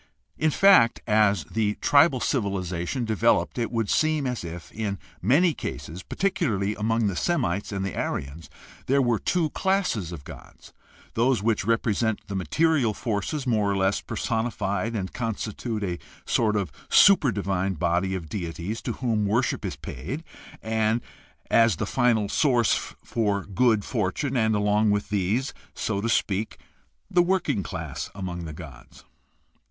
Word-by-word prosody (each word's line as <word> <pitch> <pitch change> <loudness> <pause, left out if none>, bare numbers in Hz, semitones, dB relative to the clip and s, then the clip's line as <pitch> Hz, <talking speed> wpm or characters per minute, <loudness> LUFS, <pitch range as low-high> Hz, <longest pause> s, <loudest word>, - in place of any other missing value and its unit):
In 155 - +2
fact, 155 -9 +5
as 105 -5 +3
the 105 +5 -1
tribal 140 -2 +4
civiHzation 100 -1 -1
developed 115 +3 +1
it 115 - -1
would 115 -3 0
seem 155 +1 +1
as 125 -6 -2
if, 85 0 -8
in 105 -2 -3 0.2
many 150 - +4
cases, 85 - -6
particularly 125 - -1
among 115 +2 0
the 100 -3 0
Semites 100 - -1
and 100 -1 -2
the 100 - -4
Aryans, 70 +4 -4 0.4
there 140 +2 +3
were 120 -5 +2
two 170 -4 0
classes 190 - 0
of 80 -5 -8
gods - - -13 0.2
— - - -26
those 120 -2 +2
which 115 -1 +1
represent 115 -1 +1
the 100 - -6
material 135 - +1
forces 120 +6 -2
more 110 -5 +1
or 100 - 0
less 95 +1 +1
personi 115 +1 -2
fied 100 +4 -2
and 95 -3 -3
constitute 115 -1 -3
a 90 -3 -3 0.3
sort 110 -2 +1
of 95 -7 -1 0.2
super 185 -10 +6
divine 95 -2 -1
body 90 +3 0
of 85 -4 -5
deities 90 +4 -4
to - - -3
whom 110 -5 0
worship 115 +5 0
is - - -3
to - - -29
be - - -5
paid 95 - -5 1.3
as 115 -4 +5
the - - -2
final 120 -5 +2
sources 120 -2 +1 0.2
of 100 -3 0
good 110 -2 +3
for 105 -7 0
tune, 135 +6 -3
and, 110 -3 +2
along 105 +1 +2
with 105 0 0
these, 105 +6 0 0.2
so 100 -3 -2
to 115 - -1
speak, 105 -1 0 0.5
the 180 -3 +3
working 175 - +1
class 80 -6 -5
among 90 -3 -5
the 80 - -6
gods. 70 -7 -12
110 Hz, 160 wpm, -25 LUFS, 95-120 Hz, 1.3 s, super